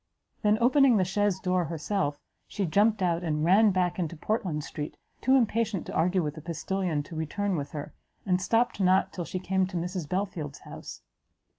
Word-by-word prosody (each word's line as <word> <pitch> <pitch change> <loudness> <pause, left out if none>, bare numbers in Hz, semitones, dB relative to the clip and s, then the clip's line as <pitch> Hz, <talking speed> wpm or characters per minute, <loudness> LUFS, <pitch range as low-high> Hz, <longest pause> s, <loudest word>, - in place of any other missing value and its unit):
then, 210 -1 +3
opening 255 -1 +5
the 185 - +2
chaise 200 0 +1
door 180 -2 +1
herself, 155 -1 -2 0.3
she 200 - -2
jumpt 205 +4 +3
out, 170 -1 +1
and 155 -2 0
ran 205 +5 +6
back 185 -2 0
into 170 -1 -2
Portland 180 -5 -1
street, 150 0 -6 0.2
too 260 +2 +4
impatient 230 -5 +1
to - - -7
argue 180 +3 +2
with 150 -1 -2
the 155 - -9
postilion 170 0 -2
to 160 - -10
return 185 +5 -1
with 145 -3 -3
her, 145 -1 -6 0.3
and 180 -1 +1
stopt 230 +3 +1
not 190 0 +3
till 175 - -4
she 185 - -4
came 190 0 0
to 185 -1 -4
Mrs 175 -2 -3
Belfield's 180 -7 -3
house. - - -10
185 Hz, 185 wpm, -28 LUFS, 160-205 Hz, 0.3 s, ran